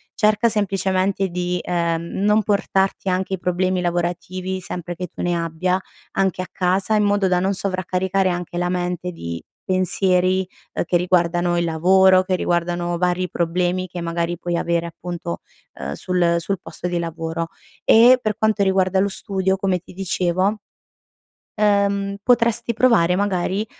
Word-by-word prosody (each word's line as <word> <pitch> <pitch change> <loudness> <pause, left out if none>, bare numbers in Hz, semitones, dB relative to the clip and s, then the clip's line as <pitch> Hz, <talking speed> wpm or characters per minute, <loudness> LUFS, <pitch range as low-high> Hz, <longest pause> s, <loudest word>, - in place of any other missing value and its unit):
Cerca 215 +2 +3
semplicemente 195 -2 0
di, 180 0 -2
ehm, 170 -1 -1 0.2
non 210 +1 +4
portarti 195 -1 0
anche 185 +1 -1
i 190 - -2
problemi 180 +1 0
lavorativi, 180 +2 -2
sempre 175 -1 -6
che 180 +1 -5
tu - - -9
ne 175 0 +1
abbia, 170 +2 -1 0.3
anche 190 -1 0
a - - -9
casa 190 +4 +1
in 210 - +3
modo 205 -1 +2
da 180 -1 +2
non 190 +2 +1
sovraccaricare 185 0 0
anche 175 -1 -4
la 175 0 0
mente 180 0 -2
di 85 - -6 0.2
pensieri, 185 0 +1 0.3
ehm, - - -1
che 175 - +2
riguardano 175 -1 +1
il 170 - +1
lavoro, 185 +3 +4
che 185 0 0
riguardano 175 0 -1
vari 180 0 +1
problemi 180 +2 -1
che 180 -1 -7
magari 170 0 -2
puoi 175 +1 -3
avere 170 0 0
appunto, 170 - -6 0.3
ehm, 70 +1 -5
sul 175 - +1
sul 190 +3 -3
posto 180 - -6
di 175 -1 -1
lavoro. 165 0 -3 0.4
E 245 +3 +7
per 215 -3 -1
quanto 220 -1 +1
riguarda 190 -1 +2
lo 200 +1 +2
studio, 190 -1 -1
come 190 -2 0
ti 180 - -15
dicevo, 185 +2 0 1.0
ehm 200 -1 +1
potresti 235 0 +2
provare 220 -8 +3
magari 200 +1 0
185 Hz, 155 wpm, -21 LUFS, 175-195 Hz, 1.0 s, E